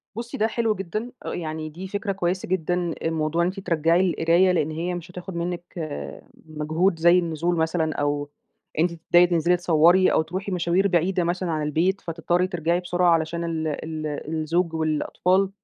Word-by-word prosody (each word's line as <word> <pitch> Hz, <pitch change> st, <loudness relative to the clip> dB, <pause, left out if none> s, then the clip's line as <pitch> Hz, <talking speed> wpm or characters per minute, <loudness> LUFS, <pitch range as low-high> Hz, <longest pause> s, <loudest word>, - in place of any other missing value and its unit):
بُصي 235 Hz, +1 st, -5 dB
ده 220 Hz, -, +2 dB
حلو 225 Hz, -1 st, 0 dB
جدًا 215 Hz, +6 st, -4 dB
آآ، -, -, -3 dB
يعني، 155 Hz, -2 st, -4 dB
دي 180 Hz, +5 st, -8 dB
فكرة 205 Hz, +1 st, -3 dB
كويِسة 185 Hz, -1 st, -2 dB
جدًا. 175 Hz, -1 st, -1 dB
الموضوع 160 Hz, 0 st, 0 dB
إن 170 Hz, -, +2 dB
أنتِ 190 Hz, +2 st, -4 dB
ترجعي 170 Hz, +1 st, +2 dB
القراية، 170 Hz, +3 st, +3 dB
لأن 160 Hz, -3 st, 0 dB
هي 170 Hz, +3 st, -3 dB
مش 175 Hz, +1 st, -8 dB
هتاخُد 180 Hz, 0 st, -8 dB
منَّك 175 Hz, 0 st, -3 dB, 0.8 s
مجهود 160 Hz, +3 st, 0 dB
زي 170 Hz, +2 st, +6 dB
النزول 170 Hz, 0 st, -1 dB
مثلًا، 160 Hz, -1 st, 0 dB
أو 145 Hz, 0 st, -1 dB, 0.5 s
أنتِ 175 Hz, +2 st, +3 dB
تبدئي 175 Hz, +2 st, +4 dB
تنزَلِي 175 Hz, +1 st, +2 dB
تصوّري 175 Hz, +2 st, +4 dB
أو -, -, +3 dB
ترُوحي 185 Hz, +5 st, -5 dB
مشاوير 180 Hz, +2 st, +2 dB
بعيدة 180 Hz, 0 st, +1 dB
مثلًا 175 Hz, 0 st, -1 dB
عن 155 Hz, -1 st, -1 dB
البيت، 170 Hz, +6 st, 0 dB
فتضطَرّي 175 Hz, +2 st, 0 dB
ترجعي 170 Hz, -1 st, 0 dB
بسرعة 180 Hz, 0 st, +1 dB
علشان 165 Hz, +1 st, -1 dB
ال 160 Hz, -1 st, -2 dB
ال 155 Hz, +1 st, -4 dB, 0.3 s
الزوج 165 Hz, +2 st, 0 dB
والأطفال. 175 Hz, +4 st, +1 dB
170 Hz, 170 wpm, -24 LUFS, 160-180 Hz, 0.8 s, زي